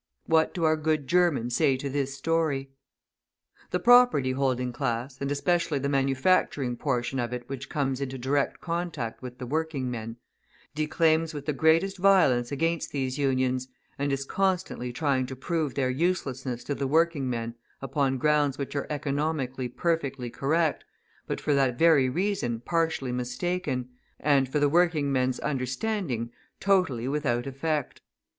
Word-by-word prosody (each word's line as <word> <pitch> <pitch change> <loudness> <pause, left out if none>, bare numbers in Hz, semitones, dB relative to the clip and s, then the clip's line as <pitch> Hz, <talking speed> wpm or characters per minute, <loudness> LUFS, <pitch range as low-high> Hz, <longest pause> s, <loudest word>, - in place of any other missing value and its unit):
What 160 -1 +2
do 175 - -2
our 155 0 +3
good 155 -2 0
Germans 155 -9 +2
say 130 +1 +3
to 140 - -4
this 140 0 -2
story? 140 -2 0 1.0
{221b} - - -43
The 180 - 0
property 245 - +5
holding 130 -2 0
class, 125 +1 -3
and 140 0 -1
especially 150 +2 +1
the 140 +1 -1
manufacturing 135 -1 +1
portion 130 -1 -1
of 120 -1 -2
it 125 -1 -5
which 135 0 -6
comes 135 -2 -1
into 135 -1 -3
direct 135 +3 0
contact 170 -9 -3
with 125 -1 -8
the 125 - -6
working 145 -2 -2
men, 115 -1 -6 0.6
declaims 160 +1 +1
with 145 -1 -6
the 150 - 0
greatest 165 +6 +2
violence 145 -11 +4
against 165 +3 -1
these 135 -1 -2
Unions, 130 -2 +1 0.3
and 140 0 0
is 135 0 -1
constantly 185 -9 -1
trying 130 -1 0
to 130 - -6
prove 155 +1 -2
their 130 -2 +1
uselessness 135 -5 -1
to 145 - -2
the 140 -1 -2
working 160 -2 +2
men 115 -1 -3 0.3
upon 135 0 0
grounds 145 0 +2
which 140 0 -5
are 140 - -2
economically 140 -3 -2
perfectly 135 -4 -2
correct, 155 +4 0 0.4
but - - -2
for 150 - 0
that 135 -3 +2
very 155 -5 +5
reason 170 - -1
partially 160 -1 -1
mistaken, 125 +2 -2 0.3
and 140 -2 +3
for 150 - -1
the 145 - +4
working 160 -2 +2
man's 130 -1 +1
understanding 130 - -2 0.3
totally 180 -12 +2
without 135 -4 0
effect. 145 +2 -3
140 Hz, 155 wpm, -27 LUFS, 130-160 Hz, 1.0 s, property